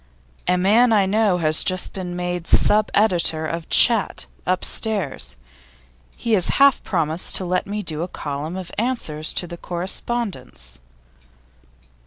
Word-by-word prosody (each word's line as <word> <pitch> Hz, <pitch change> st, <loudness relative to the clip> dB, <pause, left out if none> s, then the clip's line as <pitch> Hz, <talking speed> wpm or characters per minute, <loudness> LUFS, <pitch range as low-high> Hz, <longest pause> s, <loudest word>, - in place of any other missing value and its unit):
'A 180 Hz, +1 st, +2 dB
man 220 Hz, +6 st, +3 dB
I 205 Hz, -3 st, +3 dB
know 205 Hz, -1 st, +1 dB
has 155 Hz, -2 st, +4 dB
just 185 Hz, -1 st, -1 dB
been 180 Hz, -2 st, -6 dB
made 180 Hz, -1 st, -4 dB
sub 210 Hz, 0 st, +3 dB
editor 175 Hz, -6 st, +1 dB
of 165 Hz, +1 st, -5 dB
Chat, 230 Hz, -4 st, +4 dB, 0.2 s
upstairs. 185 Hz, -2 st, -1 dB, 0.8 s
He 230 Hz, -, -2 dB
has 185 Hz, -5 st, +4 dB
half 280 Hz, -1 st, +5 dB
promised 165 Hz, -2 st, -1 dB
to 185 Hz, -, -1 dB
let 180 Hz, +1 st, -1 dB
me 210 Hz, +1 st, -4 dB
do 155 Hz, -3 st, -4 dB
a 175 Hz, -, -3 dB
column 150 Hz, +1 st, -6 dB
of 185 Hz, -2 st, -7 dB
answers 190 Hz, -11 st, -1 dB
to 175 Hz, -1 st, -3 dB
correspondents. 170 Hz, -, -5 dB
180 Hz, 135 wpm, -21 LUFS, 165-210 Hz, 0.8 s, half